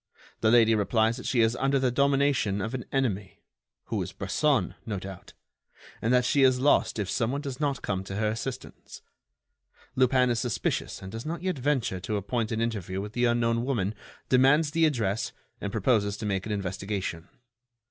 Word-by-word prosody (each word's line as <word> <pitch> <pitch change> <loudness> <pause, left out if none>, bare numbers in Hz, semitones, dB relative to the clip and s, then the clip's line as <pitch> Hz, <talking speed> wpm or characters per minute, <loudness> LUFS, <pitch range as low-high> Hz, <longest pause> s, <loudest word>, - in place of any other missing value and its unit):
The 110 - +3
lady 115 -1 +6
replies 110 +2 +2
that - - -6
she 120 - +2
is 110 +1 +3
under 135 +1 +2
the 130 -2 +1
domination 140 -6 +2
of 115 +5 -3
an 130 -2 -4
enemy—who 105 -8 -4
is - - -5
Bresson, 140 - +1
no 105 -3 -3
doubt—and 95 +4 -8
that 125 -1 +4
she 140 - +2
is 130 -1 +5
lost 140 -2 +3
if 105 -3 -2
some 115 +3 0
one 140 +1 -2
does 140 -3 -6
not 140 -3 -1
come 95 -1 -2
to 95 - -6
her 105 +1 +1
assistance. 115 +4 -6 0.9
Lupin 130 -1 +3
is 115 - 0
suspicious 120 -5 -2
and 95 - -7
does 115 +2 -6
not 165 +2 -5
yet 185 -6 -1
venture 130 -8 0
to 105 +4 -2
appoint 110 +3 -2
an 110 0 -1
interview 100 -5 -2
with 105 +2 -6
the 125 0 +1
unknown 120 -1 +1
woman, 110 -7 -1 0.3
demands 135 +4 +4
the 160 +1 +4
address 110 -8 -1 0.3
and 100 - -3
proposes 100 -2 +1
to 105 - -5
make 95 -1 -1
an - - -4
investigation. 95 -3 -3
115 Hz, 180 wpm, -27 LUFS, 100-130 Hz, 0.9 s, lady